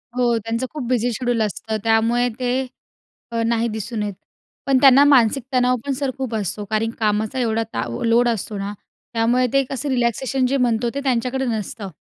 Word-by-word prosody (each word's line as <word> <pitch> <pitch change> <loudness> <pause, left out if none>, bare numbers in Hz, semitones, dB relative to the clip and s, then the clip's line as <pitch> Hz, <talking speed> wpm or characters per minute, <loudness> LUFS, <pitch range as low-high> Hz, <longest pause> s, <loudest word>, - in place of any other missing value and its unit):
हो, 240 -2 +2
त्यांचं 225 +3 -2
खूप 295 -4 -4
बिझी 245 -1 +1
शेड्यूल 245 -1 -1
असतं. 220 +1 -2
त्यामुळे 230 +2 +2
ते 255 +1 0 0.7
अ, 230 - -1
नाही 230 0 +1
दिसून 220 0 -4
येत. 205 -1 -3 0.5
पण 275 -1 +3
त्यांना 275 0 +8
मानसिक 260 -2 +4
तणाव 250 0 +3
पण 280 - -1
सर 270 0 -2
खूप 260 -4 -3
असतो 205 0 -3
कारण 220 +1 +1
कामाचा 215 +4 0
एवढा 225 -2 0
ता - - -1 0.2
लोड 235 +1 +4
असतो 215 -2 -3
ना 200 +1 -4 0.4
त्यामुळे 240 +2 +2
ते 275 0 +4
कसं 275 +2 -3
रिलॅक्सेशन 255 +1 0
जे 275 +2 +1
म्हणतो 240 -2 +1
ते - - -1
त्यांच्याकडे 260 0 0
नसतं. 215 -3 -4
235 Hz, 180 wpm, -21 LUFS, 225-255 Hz, 0.7 s, त्यांना